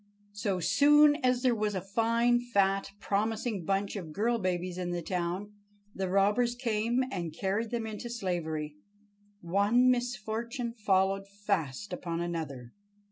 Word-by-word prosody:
So 205 -2 -1
soon 295 - +5
as 250 0 +2
there 255 -2 +4
was 210 -2 -1
a - - 0
fine, 230 +5 +2
fat, 195 -5 +1
promising 210 -1 -1
bunch 195 +2 0
of 175 -6 -6
girl 230 +6 +1
babies 180 -1 -2
in 180 -1 -2
the 175 -1 -3
town, 180 +4 -3 0.4
the 190 -1 -2
robbers 210 +6 +2
came 235 +1 0
and 170 -4 -3
carried 205 +4 -1
them 235 -1 -2
into 220 +2 -6
slavery. 160 -9 -3 0.6
One 205 +8 +3
misfortune 240 0 -2
followed 195 -3 +1
fast 200 -3 -3
upon 170 -2 -3
another. 155 -8 -4
205 Hz, 135 wpm, -30 LUFS, 180-235 Hz, 0.6 s, soon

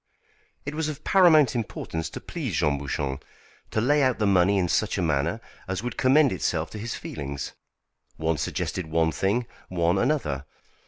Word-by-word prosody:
It 145 - -4
was 155 0 -1
of 150 0 -7
paramount 160 - +5
importance 80 -7 -3
to - - -7
please - - -4
Jean 70 -1 +1
Bouchon, 70 -1 -3 0.5
to - - -1
lay 145 +6 +3
out 130 -3 +2
the 105 - +1
money 100 0 +4
in 90 -2 +2
such 105 +5 +1
a - - 0
manner 80 +6 0 0.3
as 95 +2 -3
would 125 -2 -3
commend 135 +1 +4
itself 85 -3 -1
to 105 - -7
his 115 +2 -4
feelings. 70 -1 -5 0.6
One 80 -1 0
suggested 90 -3 -2
one 80 0 +2
thing, 100 +9 0 0.2
one 85 +1 +1
another. 95 - 0
95 Hz, 170 wpm, -26 LUFS, 80-125 Hz, 0.6 s, paramount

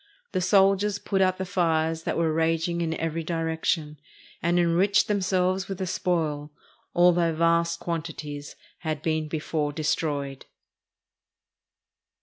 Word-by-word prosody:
The 185 -3 0
soldiers 195 +2 +3
put 195 -1 -1
out 185 -1 +3
the 190 - -3
fires 165 -3 0
that - - -1
were 165 -1 +1
raging 165 +1 0
in 165 -1 -1
every 165 0 -2
direction, 160 -2 -1 0.4
and 170 +1 +2
enriched 175 +4 +3
themselves 190 -2 +1
with 195 - -4
the 190 - -2
spoil, 160 -5 -1 0.5
although 175 -1 +4
vast 170 +1 +2
quantities 155 -3 -5 0.2
had 155 -2 -3
been 155 -1 0
before 150 -1 -2
destroyed. 145 -2 -2
165 Hz, 125 wpm, -26 LUFS, 155-180 Hz, 0.5 s, although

